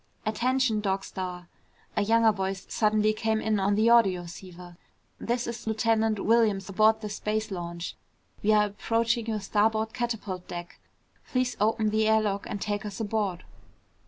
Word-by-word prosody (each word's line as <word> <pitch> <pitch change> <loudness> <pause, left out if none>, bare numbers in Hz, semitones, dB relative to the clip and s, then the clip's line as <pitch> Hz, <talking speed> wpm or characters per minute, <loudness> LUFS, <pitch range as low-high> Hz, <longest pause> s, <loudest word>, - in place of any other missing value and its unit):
"Attention 245 +1 +1
Dog 195 -1 -1
Star!" 180 -2 -6 0.5
A - - +2
younger 225 +2 +4
voice 195 -1 -3
suddenly 215 0 +2
came 220 0 0
in 220 -1 0
on 200 +1 +2
the 215 +2 +2
audioceiver. 180 -4 0 0.4
"This 240 +1 -1
is 235 -1 -6
Lieutenant 220 -1 +1
Williams 215 -4 +3
aboard 215 +3 +3
the 215 - -4
space 215 +1 -2
launch. 170 -1 -5 0.5
We 215 - +2
are 210 -1 +5
approaching 225 +2 0
your 220 -2 -1
starboard 220 +2 +1
catapult 225 -7 -4
deck. 175 0 -8 0.5
Please 255 -1 0
open 215 0 +2
the 215 0 +2
air 220 0 +5
lock 200 -2 -2
and 205 - -3
take 205 0 -2
us 210 0 -6
aboard." 205 -5 -2
215 Hz, 155 wpm, -27 LUFS, 195-225 Hz, 0.5 s, are